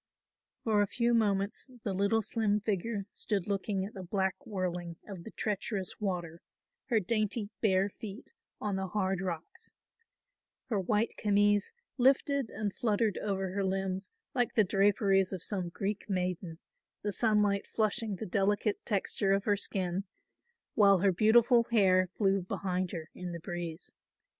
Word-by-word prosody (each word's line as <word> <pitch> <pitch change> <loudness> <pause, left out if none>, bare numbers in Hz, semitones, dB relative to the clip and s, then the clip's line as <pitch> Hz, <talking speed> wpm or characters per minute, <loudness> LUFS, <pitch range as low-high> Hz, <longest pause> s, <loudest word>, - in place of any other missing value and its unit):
For 215 -2 +3
a 205 - +2
few 235 +3 +1
moments 205 +1 +1
the 200 - -1
little 200 +4 +2
slim 210 -1 +1
figure 205 0 -2
stood 200 -5 -2
looking 195 -1 -1
at 205 - -9
the 195 - -7
black 190 +7 -2
whirling 180 -4 -3
of 190 -5 -8
the - - -6
treacherous 205 -2 -3
water, 175 -5 -3 0.5
her 230 -4 +3
dainty 215 +1 -1
bare 195 -3 +3
feet 210 - -9 0.3
on 205 -2 -1
the 190 0 -2
hard 190 -1 -1
rocks. 175 -4 -6 1.0
Her 215 -5 +1
white 210 +4 +1
camise 205 0 +3 0.3
lifted 270 0 +3
and 205 -1 -3
fluttered 215 -3 +1
over 195 -2 -2
her 200 0 0
limbs 190 0 -2 0.2
like 245 -3 +1
the 215 - +6
draperies 195 -1 +3
of 185 -3 -3
some 185 -4 -1
Greek 200 +4 -4
maiden, 180 -3 -2 0.5
the 205 - 0
sunlight 210 -2 +2
flushing 215 -1 0
the 205 - -5
delicate 205 +2 0
texture 195 -1 +1
of 195 0 +1
her 205 -1 +2
skin, 190 -1 -1 0.7
while 200 -2 +6
her 195 -1 +4
beautiful 230 +5 +5
hair 190 -5 +4
flew 195 -2 +2
behind 185 0 -2
her 160 -2 -6
in 180 -1 -6
the 170 - -5
breeze. 175 -1 -6
200 Hz, 150 wpm, -31 LUFS, 185-215 Hz, 1.0 s, the